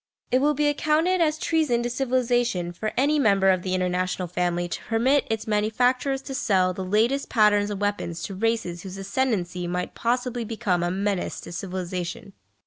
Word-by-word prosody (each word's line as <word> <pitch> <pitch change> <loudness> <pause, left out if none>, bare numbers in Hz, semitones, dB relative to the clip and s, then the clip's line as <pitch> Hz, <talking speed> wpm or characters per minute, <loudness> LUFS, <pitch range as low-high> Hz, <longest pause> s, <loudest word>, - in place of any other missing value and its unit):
It 255 +1 +3
will 295 +1 +3
be 295 +1 +2
accounted 310 +5 +2
as 310 -1 +2
treason 310 -8 +1
to 240 - -1
civilisation 240 -8 0
for 215 +5 -3
any 290 +4 +3
member 195 -6 +4
of 185 -1 +1
the 185 0 -1
international 180 0 -1
family 175 0 -1
to - - -5
permit 255 +5 +2
its 220 -1 -2
manufacturers 245 +6 +1
to 270 - -6
sell 190 -8 +2
the 190 - -5
latest 225 +9 +1
patterns 210 -2 +3
of 205 -1 -4
weapons 205 -5 -2
to 195 - -5
races 195 -4 -1
whose 190 0 -8
ascendency 195 -4 -1
might 180 +1 -3
possibly 245 0 -1
become 215 -5 -1
a 175 - 0
menace 195 +1 -2
to - - -9
civilisation. 180 +1 -5
210 Hz, 175 wpm, -25 LUFS, 185-255 Hz, -, member